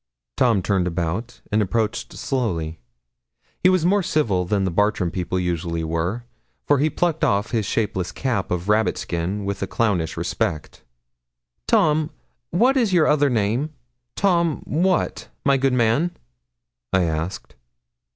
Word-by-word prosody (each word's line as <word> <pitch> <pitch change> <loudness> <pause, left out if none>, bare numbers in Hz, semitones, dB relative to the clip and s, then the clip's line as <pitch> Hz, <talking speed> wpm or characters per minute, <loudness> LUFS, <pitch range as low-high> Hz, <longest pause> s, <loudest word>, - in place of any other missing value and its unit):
Tom 115 -7 +3
turned 95 -2 +1
about, 90 +7 -3
and 105 +1 +3
approached 110 +2 -1
slowly. 85 - -2 0.8
He 180 - +6
was 185 -3 +2
more 200 +3 +3
civil 115 - +1
than 100 +2 0
the 95 - 0
Bartram 100 -2 +1
people 90 0 -2
usually 85 -2 -2
were, 85 +8 -2 0.4
for 145 -2 +3
he 155 +3 +3
plucked 165 +1 -1
off 100 +2 +1
his 110 -5 0
shapeless 95 -5 -1
cap 120 -8 -2
of 90 +1 -2
rabbit 110 +1 +2
skin 90 +4 -3
with 100 -1 -3
a 95 - -1
clownish 90 -7 0
respect. 75 -1 -2 0.9
'Tom, 155 0 +3 0.4
what 245 +10 +3
is 230 -6 +2
your 170 -4 +5
other 145 -1 +3
name, 120 +7 0 0.4
Tom 170 -5 +1
what, 180 +4 0 0.2
my 140 -1 +5
good 135 0 +2
man?' 125 +8 +2 0.7
I 95 -1 +3
asked. 80 +2 -3
110 Hz, 140 wpm, -22 LUFS, 90-150 Hz, 0.9 s, He